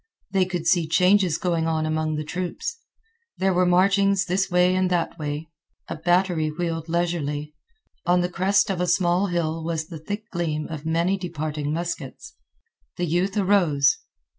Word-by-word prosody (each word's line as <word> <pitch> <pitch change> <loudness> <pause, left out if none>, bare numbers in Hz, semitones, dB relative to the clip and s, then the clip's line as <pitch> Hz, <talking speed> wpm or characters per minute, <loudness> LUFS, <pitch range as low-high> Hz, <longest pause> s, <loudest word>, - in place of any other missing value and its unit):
They 190 -1 +3
could 175 -2 -4
see 175 -2 +3
changes 180 0 +3
going 170 -2 0
on 160 -1 0
among 155 0 -1
the 150 - -3
troops. 185 - -4 0.6
There 190 0 +2
were 180 0 +3
marchings 195 +1 +3
this 190 +2 0
way 180 0 +3
and 185 0 +1
that 175 -1 -1
way. 150 +1 -4 0.4
A - - -3
battery 175 -1 +1
wheeled 165 0 -3
leisurely. 150 -3 -1 0.5
On 180 0 +4
the 175 - +1
crest 190 +2 +2
of 180 -2 -2
a 180 - 0
small 175 +2 +2
hill 165 -2 -1
was 160 -1 -3
the 165 -3 -7
thick 205 +7 -6
gleam 160 -4 -2
of 155 -1 -6
many 170 +4 +1
departing 155 -4 -3
muskets. 175 - -5 0.6
The 175 - 0
youth 180 +5 0
arose. 175 -9 +3
175 Hz, 165 wpm, -24 LUFS, 160-185 Hz, 0.6 s, On